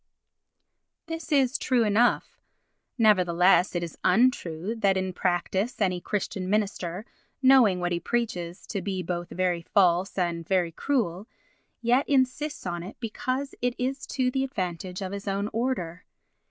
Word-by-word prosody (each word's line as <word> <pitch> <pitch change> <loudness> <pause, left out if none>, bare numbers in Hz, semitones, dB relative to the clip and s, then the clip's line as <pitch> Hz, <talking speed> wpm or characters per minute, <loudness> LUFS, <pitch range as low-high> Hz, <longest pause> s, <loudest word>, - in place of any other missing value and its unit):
This 325 -1 -6
is 270 -2 +3
true 250 -4 +2
enough. 220 +3 +2 0.6
Nevertheless 180 -4 +4
it 175 - 0
is 170 - -7
untrue 190 - +2
that 195 -3 +2
in 185 0 -2
practice 190 +6 -1
any 180 -4 +1
Christian 190 -2 -3
minister, 195 -2 -1 0.4
knowing 255 -8 +6
what 175 0 -1
he 170 - 0
preaches 180 -5 -3
to 200 - -4
be 190 -1 -3
both 175 0 -4
very 180 -1 0
false 180 +1 +2
and 170 -2 -1
very 180 -3 +1
cruel, 210 - -1 0.6
yet 245 +4 +2
insists 280 +2 0
on 175 0 -3
it 185 +5 -9
because 255 +4 -3
it 245 0 0
is 265 +3 -3
to 255 -2 0
the 265 +1 0
advantage 185 - -4
of 185 - -4
his 200 0 -6
own 200 +1 -1
order. 215 -8 -2
195 Hz, 145 wpm, -27 LUFS, 180-245 Hz, 0.6 s, knowing